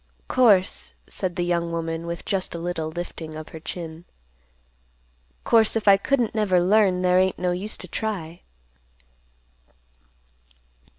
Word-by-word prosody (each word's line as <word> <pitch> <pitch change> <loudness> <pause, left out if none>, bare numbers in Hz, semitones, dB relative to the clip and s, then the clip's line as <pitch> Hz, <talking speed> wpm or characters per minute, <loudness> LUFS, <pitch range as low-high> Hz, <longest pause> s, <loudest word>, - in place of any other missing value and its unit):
"Course," 210 -7 +3
said 185 -3 -2
the 175 - -1
young 170 -1 0
woman, 165 0 -3
with 170 0 -5
just 190 -3 -2
a - - -3
little 165 -2 -3
lifting 160 -1 -7
of 155 0 -8
her 160 - -9
chin; 165 0 -7 1.4
"Course, 225 -1 +4
if 220 -2 -2
I 200 - +9
couldn't 240 +2 0
never 205 -5 +2
learn, 185 0 +3
there 180 0 +4
ain't 185 0 +1
no 180 0 0
use 190 +4 -2
to - - -6
try." 175 -7 -4
180 Hz, 135 wpm, -24 LUFS, 170-200 Hz, 1.4 s, I